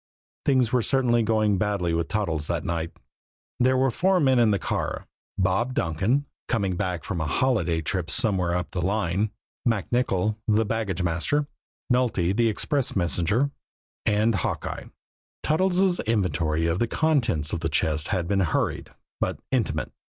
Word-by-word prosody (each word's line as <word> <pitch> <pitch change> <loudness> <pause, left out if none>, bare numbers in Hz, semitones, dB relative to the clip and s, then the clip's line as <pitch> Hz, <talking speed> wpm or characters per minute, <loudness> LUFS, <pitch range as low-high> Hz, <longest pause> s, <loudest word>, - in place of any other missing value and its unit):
Things 130 -4 +2
were 125 - +4
certainly 120 -1 +2
going 110 -3 +2
badly 100 -5 0
with 85 0 0
Toddles 85 -8 -1
that 85 -2 -1
night. 85 -1 -2 0.7
There 130 +1 +3
were 130 0 +2
four 185 +8 +2
men 130 -5 +4
in 115 -2 +5
the 100 - +2
car: - - -3 0.3
Bob 95 +7 +1
Donkin, 95 - +1 0.2
coming 100 -6 0
back 90 -1 -2
from 85 -5 -3
a 80 - -1
holiday 90 -5 +1
trip 85 +2 -1
somewhere 95 -6 +2
up 90 -1 -3
the 90 - -2
line; 100 +1 0 0.3
MacNicoll, 110 -2 0
the 110 0 +3
baggage 100 -4 -2
master; 90 - 0 0.5
Nulty, 110 -8 +1
the 115 0 +3
express 130 +5 -1
messenger 95 - +1 0.5
and 110 +2 +2
Hawkeye. 95 - -3 0.6
Toddles' 185 +3 +2
inventory 90 -7 0
of 85 +2 0
the 120 - +1
contents 120 - +1
of - - -1
the 80 0 -1
chest 75 -1 0
had 90 -4 -1
been 100 +1 +1
hurried 85 -5 0 0.3
but - - -1
intimate. - - -1
105 Hz, 150 wpm, -25 LUFS, 85-120 Hz, 0.7 s, in